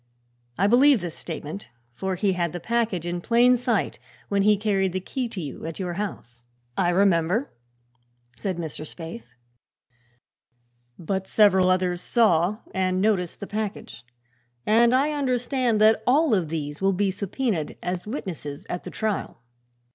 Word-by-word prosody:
I 195 - +2
believe 255 +4 +6
this 175 -3 -5
statement, 160 +2 -7 0.3
for 190 +9 -3
he 195 +1 +1
had 175 -2 -1
the 175 - -4
package 225 -4 -1
in 175 0 -3
plain 240 +4 +4
sight 240 -3 -1 0.3
when 200 -1 +2
he 210 +1 +4
carried 195 -3 0
the 185 - -1
key 245 +6 -4
to 205 - -6
you, 145 -6 -6
at 165 - -6
your 180 -3 -3
house." 125 - -6 0.3
"I 175 - +2
remember," 185 - +2 0.8
said 190 -3 -3
Mr. 160 -3 -5
Spaythe. 160 -7 -8 1.7
"But 190 +2 -3
several 190 -4 +4
others 180 -1 +1
saw 210 -3 +2
and 185 -1 0
noticed 190 -4 0
the - - -3
package, 210 -7 -5 0.6
and 235 +3 +4
I 285 +4 +2
understand 255 -4 0
that 220 0 +5
all 290 +1 +4
of 180 -6 +1
these 150 -1 -4
will 195 0 +3
be 195 +1 +1
subpœnaed 200 - -2
as 180 +2 -3
witnesses 170 - -6
at 180 - -4
the - - -5
trial." 215 - -3
195 Hz, 150 wpm, -25 LUFS, 175-220 Hz, 1.7 s, believe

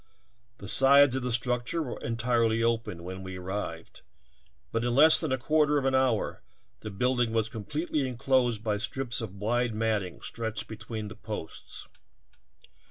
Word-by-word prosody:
The - - -9
sides 140 0 +6
of 130 - -1
the 125 0 -2
structure 125 +6 0
were 125 - -6
entirely 115 -1 +1
open 115 -7 -1
when 95 +1 -7
we 95 -1 -7
arrived, 90 -3 -6 0.7
but 115 0 -1
in 120 0 0
less 155 +3 +8
than 160 -5 -2
a 130 - +2
quarter 150 +2 +2
of 140 - -1
an 135 - +2
hour 130 -4 +1 0.4
the 110 - -7
building 120 +3 0
was 115 -1 +1
completely 145 - -2
enclosed 125 -3 +1
by 105 -2 0
strips 125 +2 -3
of 105 -4 -6
wide 115 +3 0
matting 110 -5 -1
stretched 110 -1 -4
between 110 0 -6
the 105 - -9
posts. 105 -7 -8
115 Hz, 160 wpm, -28 LUFS, 110-130 Hz, 0.7 s, less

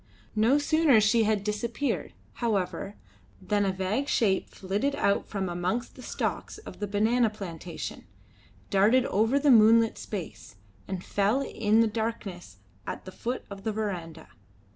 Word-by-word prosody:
No 225 +6 +4
sooner 295 -4 +4
she 220 +1 +3
had 210 -2 +1
disappeared, 230 +6 -2 0.3
however, 200 -2 -1 0.4
than 205 - 0
a 195 - +1
vague 190 +9 -1
shape 195 -8 +1
flitted 205 +9 -2
out 200 -8 +1
from 195 -3 -3
amongst 180 +7 -2
the 255 - -12
stalks - - -3
of - - -11
the 205 - -2
banana 220 +4 +2
plantation, 175 -5 -7 0.6
darted 220 +6 +4
over 225 +6 +2
the 285 0 +4
moonlit 225 0 +6
space, 180 - -7 0.3
and 190 -1 -4
fell 205 +7 +1
in 220 -3 +2
the 230 - +4
darkness 210 - -4 0.3
at - - -5
the 185 - -8
foot 245 +6 -4
of 195 -1 -8
the 220 - -1
verandah. 175 -7 -5
210 Hz, 145 wpm, -28 LUFS, 195-235 Hz, 0.6 s, moonlit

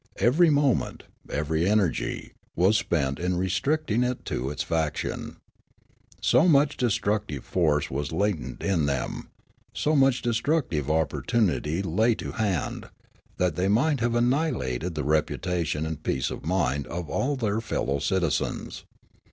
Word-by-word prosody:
Every 145 - +4
moment, 145 -3 +1 0.3
every 80 +4 0
energy, 100 -7 0 0.2
was 95 +5 +4
spent 70 -5 -1
in 90 0 0
restricting 105 - 0
it 125 0 -2
to 65 +3 -2
this 75 - -3
fraction. 80 -2 -2 0.8
So 175 - +4
much 145 -2 +4
destructive 105 - -1
force 75 -5 +1
was 70 +2 -3
latent 95 0 -2
in 85 -7 +1
them, 70 -3 -3 0.4
so 155 +1 +1
much 135 -2 +3
destructive 115 - 0
opportunity 80 - 0
lay 110 +7 +2
to - - -6
hand, 100 -7 -2 0.5
that 90 -3 +1
they 90 +3 0
might 135 +8 +2
have 120 0 0
annihilated 120 - 0
the 75 - -2
reputation 80 +1 0
and 80 -2 -5
peace 65 - -1
of - - -7
mind 75 -6 0
of 85 +1 -5
all 140 - 0
their 110 -4 -1
fellow 70 -10 -1
citizens. 90 -1 -1
95 Hz, 135 wpm, -26 LUFS, 75-120 Hz, 0.8 s, Every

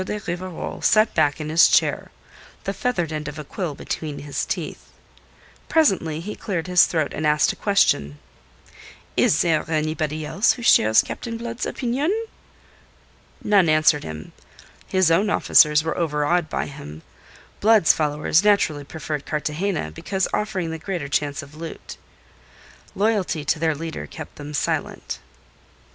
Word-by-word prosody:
de 210 +2 -4
Rivarol 180 0 -5
sat 215 +1 +4
back 150 -2 +2
in 155 0 -4
his 160 +2 +6
chair, - - +2 0.5
the 195 - -2
feathered 195 -6 -1
end 150 -1 -4
of 150 +1 -7
a 150 - -6
quill 160 0 -5
between 150 0 -5
his 145 -1 -4
teeth. - - -5 0.8
Presently 185 - +2
he 205 +6 -6
cleared 180 -6 -3
his 180 -1 +5
throat 160 -4 -1
and 155 - -4
asked 150 0 +3
a - - -12
question. 75 - +1 1.0
"Is 150 - +3
there 165 -3 +2
anybody 155 0 -1
else 195 +8 +2
who 240 - -9
shares 110 - +5
Captain 230 -1 -6
Blood's 235 +1 -4
opinion?" 260 +6 -1 1.3
None 200 -5 +4
answered 155 -1 +3
him. 80 0 -8 0.6
His 185 -3 +2
own 195 +6 +3
officers 150 -5 +5
were 160 - -2
overawed 160 +1 0
by - - -2
him; 75 - -10 0.6
Blood's 215 -5 +5
followers 150 +2 +1
naturally 200 -8 +2
preferred 150 0 -6
Cartagena, 155 - -2
because 190 - -2
offering 190 -6 -2
the 160 - -5
greater 170 -5 -4
chance 145 0 -1
of 140 +1 -14
loot. 160 +1 -8 1.0
Loyalty 195 -7 0
to 150 - +1
their 160 -1 +1
leader 160 +2 -6
kept - - -10
them 150 0 -7
silent. - - -2
160 Hz, 145 wpm, -22 LUFS, 150-195 Hz, 1.3 s, his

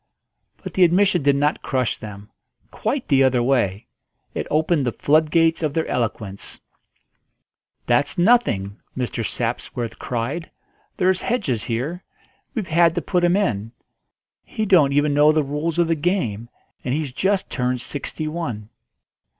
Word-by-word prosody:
But - - -6
the 185 - +4
admission 180 +1 +4
did 140 0 +3
not 145 +2 +1
crush 130 -3 -1
them: 105 -1 -10 0.4
quite 275 -2 -2
the 135 -2 +4
other 130 -2 +3
way. 115 -7 +1 0.5
It - - -3
opened 155 -1 +2
the - - +1
floodgates 160 +5 +2
of 150 -3 -1
their 160 - +1
eloquence. 105 -4 -4 1.3
"That's 145 +4 +2
nothing," 175 - +2 0.2
Mr. 125 -2 -2
Sapsworth 115 0 -3
cried. 130 +8 -3 0.5
"There's 185 0 +2
Hedges 150 - -1
here; 140 +10 -3 0.5
we've 215 -8 -3
had 165 0 +4
to 175 - 0
put 180 -2 0
him 175 +1 +4
in; 115 - -1 0.7
he 220 - -3
don't 170 -9 +5
even 145 +1 +2
know 150 +1 +5
the 155 -1 +2
rules 150 +4 -2
of 170 -1 +3
the 165 - +2
game, 145 - -1 0.3
and 125 - -1
he's 150 -3 -2
just 190 +7 0
turned 125 0 -1
sixty 150 +4 -5
one." 125 -10 -4
145 Hz, 145 wpm, -22 LUFS, 120-170 Hz, 1.3 s, don't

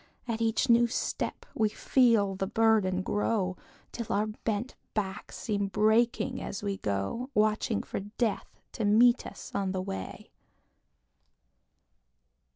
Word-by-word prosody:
At 230 -1 -2
each 225 +2 +1
new 235 0 +5
step 235 - -3
we 215 -1 +2
feel 225 -4 +3
the 195 0 -2
burden 210 -4 +2
grow, 200 -2 0 0.4
Till 235 -2 -5
our 210 +1 +2
bent 215 +2 -3 0.2
backs 195 -3 -3
seem 205 -3 -1
breaking 230 +5 +2
as 200 - -5
we 200 -1 -2
go, 100 - -2
Watching 215 0 +1
for - - -4
Death 210 +2 -3
to 225 - -4
meet 235 +4 +5
us - - -10
on 195 -1 -1
the 185 - -1
way. 95 - -6
215 Hz, 130 wpm, -29 LUFS, 195-230 Hz, 0.4 s, new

